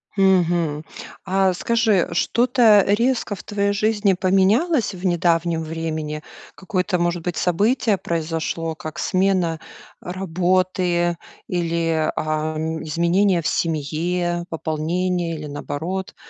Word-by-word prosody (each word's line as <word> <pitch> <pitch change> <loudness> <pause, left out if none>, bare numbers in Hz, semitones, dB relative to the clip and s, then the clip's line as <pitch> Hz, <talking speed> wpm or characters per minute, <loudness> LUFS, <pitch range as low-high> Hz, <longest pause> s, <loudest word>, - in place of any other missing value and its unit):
Мгм. 175 -5 +2 0.4
А 190 0 +2
скажи, 225 -2 +2
что-то 230 +1 +4
резко 230 0 +1
в - - -12
твоей 200 -1 0
жизни 210 -1 +2
поменялось 200 - +2
в 185 +2 -7
недавнем 170 -1 +1
времени? 155 -1 -4 0.3
Какое-то 185 -1 -1
может 175 0 0
быть 175 -1 -3
событие 210 +4 +2
произошло? 165 -1 -3
Как 155 +1 -8
смена 185 -4 +1 0.4
работы 180 -1 0 0.3
или, 165 -2 0
а, 155 0 -2 0.3
изменения 170 +4 +2
в - - 0
семье, 170 +3 -1
пополнение 165 +2 -2
или 155 -1 -7
наоборот 160 +6 -5
175 Hz, 105 wpm, -21 LUFS, 165-195 Hz, 0.4 s, что-то